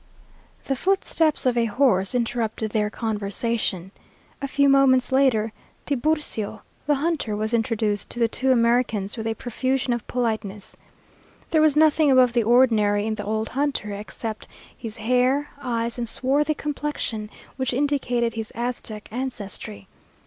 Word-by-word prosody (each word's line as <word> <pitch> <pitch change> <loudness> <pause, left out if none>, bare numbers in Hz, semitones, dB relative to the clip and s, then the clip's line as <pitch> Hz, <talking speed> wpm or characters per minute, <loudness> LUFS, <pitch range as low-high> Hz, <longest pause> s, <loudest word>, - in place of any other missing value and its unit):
The 270 - -1
footsteps 325 -2 +1
of 250 -1 +3
a 235 -1 +2
horse 220 -2 +2
interrupted 230 -2 -1
their 210 -1 +1
conversation. 210 -3 -2 0.5
A 275 - -2
few 280 +1 +2
moments 270 -2 +4
later, 245 -5 +2 0.3
Tiburcio, 275 -7 -1 0.2
the 295 - +4
hunter, 285 -7 -1
was 215 +2 -2
introduced 220 -3 0
to - - -9
the 235 -1 +3
two 260 +3 0
Americans 230 -4 +2
with 225 -1 -4
a 225 - -1
profusion 255 +2 -1
of 235 -2 -4
politeness. 215 -5 -3 0.8
There 315 - +4
was 310 -2 +4
nothing 310 -1 +4
above 255 -2 +5
the 240 - +3
ordinary 215 -3 +3
in 220 - -1
the 205 -1 -5
old 220 +1 -1
hunter, 275 -6 -1
except 215 +2 -6 0.3
his 225 -2 -7
hair, 255 +5 +1
eyes, 235 -2 -2
and 235 -2 -2
swarthy 290 +5 +1
complexion, 290 -8 -3 0.3
which 260 -1 0
indicated 245 -3 0
his 225 -1 -5
Aztec 235 -3 -4
ancestry. 205 - -5
235 Hz, 140 wpm, -24 LUFS, 220-270 Hz, 0.8 s, above